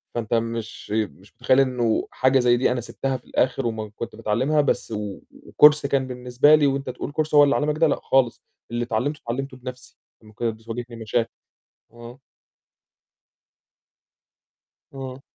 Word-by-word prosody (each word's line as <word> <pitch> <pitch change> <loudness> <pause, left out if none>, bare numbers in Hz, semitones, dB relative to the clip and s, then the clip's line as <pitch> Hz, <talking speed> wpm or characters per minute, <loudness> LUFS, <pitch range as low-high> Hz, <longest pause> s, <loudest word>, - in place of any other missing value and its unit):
فأنت 115 -1 -3
مش 115 -2 -3
مش 105 -9 -3
متخيّل 130 - +3
إنه 125 -4 +1
حاجة 130 +1 +3
زي 120 -1 +4
دي 125 - +2
أنا 125 -1 -1
سِبتها 135 +3 -3
في 125 - -22
الآخر 125 -1 0
وما 110 -2 -3
كنت 115 - -6
باتعلّمها 125 +8 +1
بس 140 - -1
و 105 -2 -5
وCourse 150 -1 +4
كان 135 -2 0
بالنسبة 125 +4 +3
لي 150 -2 +3
وأنت 135 -1 -2
تقول 125 +3 -5
Course 155 0 -4
هو 145 - +9
اللي 140 0 +3
علّمك 150 +1 0
ده، 160 0 +4
لأ - - 0
خالص، 130 -3 +2 0.3
اللي 120 0 -1
اتعلّمته، 125 +6 -2
اتعلّمته 130 +3 -4
بنفْسي، 125 0 -10 0.3
لمّا 110 0 -16
كانت 115 0 -2
بتواجهني 115 +1 -7
مشاكل. 115 +1 -1 0.6
آه. 120 +2 -12 2.7
آه. 130 -1 -7
125 Hz, 155 wpm, -23 LUFS, 115-135 Hz, 2.7 s, هو